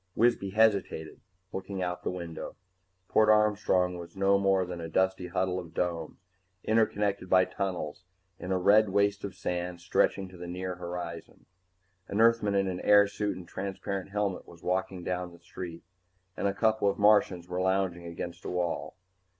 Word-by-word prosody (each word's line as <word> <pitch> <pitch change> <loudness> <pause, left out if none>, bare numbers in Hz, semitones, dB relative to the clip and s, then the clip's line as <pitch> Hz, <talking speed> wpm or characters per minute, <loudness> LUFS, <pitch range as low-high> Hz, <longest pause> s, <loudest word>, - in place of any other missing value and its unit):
Wisby 115 -4 +2
hesitated, 100 -7 +1 0.3
looking 95 0 -4
out 90 0 -3
the - - -2
window. 85 -3 -6 0.5
Port 110 0 +4
Armstrong 105 -4 +3
was 85 +1 -10
no 100 0 +3
more 95 -1 +3
than 90 -1 -6
a 80 - -5
dusty 95 +1 +1
huddle 95 0 -1
of 85 - -10
domes, 85 -3 -2 0.5
interconnected 105 -4 +1
by 95 0 +5
tunnels, 90 -5 -4 0.4
in 90 - -5
a 95 - +2
red 105 +3 +5
waste 100 +1 +1
of 100 - -5
sand 90 0 -3
stretching 90 +2 +1
to 90 - -13
the 90 0 -7
near 90 +1 -4
horizon. 85 -1 -7 0.6
An 100 - -2
Earthman 115 -3 +4
in 95 -2 0
airsuit 100 0 +4
and 90 -2 -10
transparent 95 0 -4
helmet 100 -2 -2
was 85 -1 -15
walking 95 0 -1
down 90 0 -3
the 85 - -15
street 85 -1 -8 0.5
and - - 0
a 100 - 0
couple 110 -1 +2
of - - -2
Martians 100 -4 +4
were 90 0 -2
lounging 95 -2 0
against 85 +1 -6
a - - -4
wall. 90 -1 -2
95 Hz, 165 wpm, -29 LUFS, 90-100 Hz, 0.6 s, by